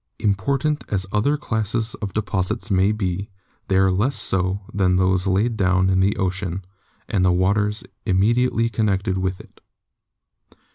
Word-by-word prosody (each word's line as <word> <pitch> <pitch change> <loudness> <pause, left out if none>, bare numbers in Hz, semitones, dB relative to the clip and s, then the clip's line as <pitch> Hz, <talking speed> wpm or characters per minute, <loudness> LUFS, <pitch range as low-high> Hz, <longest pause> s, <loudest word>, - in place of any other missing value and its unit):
Important 135 +9 0
as 95 -2 -1
other 140 +8 +1
classes 110 -3 -1
of 100 -3 -4
de 110 - -1
posits 95 +1 -2
may 95 +2 +3
be, 100 -2 -3 0.4
they 95 - +1
are 95 0 +4
less 105 +9 +1
so 95 +1 +1
than 95 -2 +2
those 95 0 +2
laid 105 +5 +1
down 95 -2 +2
in 95 - +2
the 95 +2 +2
ocean 95 0 -2 0.4
and 95 -4 0
the 90 - +4
waters 105 +4 +1 0.2
immediately 115 +4 +2
connected 100 -4 0
with 95 0 -2
it. - - -17
95 Hz, 150 wpm, -22 LUFS, 95-110 Hz, 0.4 s, are